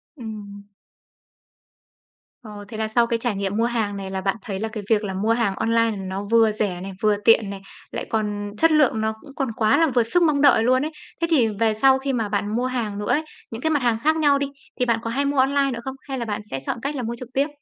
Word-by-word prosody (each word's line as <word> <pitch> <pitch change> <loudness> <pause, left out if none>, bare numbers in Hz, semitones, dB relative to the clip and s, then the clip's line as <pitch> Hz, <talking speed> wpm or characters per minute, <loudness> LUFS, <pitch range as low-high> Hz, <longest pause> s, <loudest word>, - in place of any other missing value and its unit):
Ừm. 210 -5 -8 1.8
Ồ, 225 - -12 0.2
thế 225 - -8
là 220 0 -1
sau 235 +2 +2
cái 235 - 0
trải 235 -2 -1
nghiệm 195 +1 -2
mua 230 - +2
hàng 220 -4 -1
này 195 -1 -6
là 190 0 -3
bạn 195 0 0
thấy 195 -1 -5
là 220 - -2
cái 220 -1 -6
việc 220 -2 +3
là 195 -2 -3
mua 210 +4 +1
hàng 230 -4 0
online 230 +1 +2
nó 190 +1 -4
vừa 225 -1 +5
rẻ 205 -4 -2
này, 195 +1 -6
vừa 210 -1 +3
tiện 225 -3 +5
này, 195 -1 -7 0.3
lại - - -4
còn 205 -2 -2
chất 325 +5 +4
lượng 295 -8 +3
nó 220 0 0
cũng 280 -2 -14
còn 270 - -1
quá 220 +3 +3
là 325 +1 +4
vừa 240 - +5
sức 345 +10 +2
mong 300 -4 +2
đợi 270 -6 +5
luôn 255 +4 +3
ấy. 310 - -4 0.3
Thế 335 - +2
thì 260 -8 +4
về 225 -1 +3
sau 265 +4 +4
khi 270 0 -2
mà 225 -4 -1
bạn 205 +1 -1
mua 245 +2 0
hàng 230 -5 -2
nữa 205 - -4
ấy, 305 - +2 0.3
những 225 +1 -6
cái 315 - +1
mặt 295 -3 +1
hàng 235 -2 +2
khác 315 +1 +4
nhau 290 -3 +3
đi, 280 - -1 0.3
thì 250 - +2
bạn 230 -2 +1
có 230 - -4
hay 275 +5 0
mua 285 0 -1
online 275 +1 +3
nữa 240 - -4
không? 265 +1 -5
Hay 270 -1 -3
là 235 - -3
bạn 210 -1 -3
sẽ 135 - -2
chọn 135 - -3
cách 280 +3 -3
là 255 - -3
mua 235 +1 -3
trực 245 0 -9
tiếp? 275 +2 +2
230 Hz, 270 wpm, -23 LUFS, 210-265 Hz, 1.8 s, vừa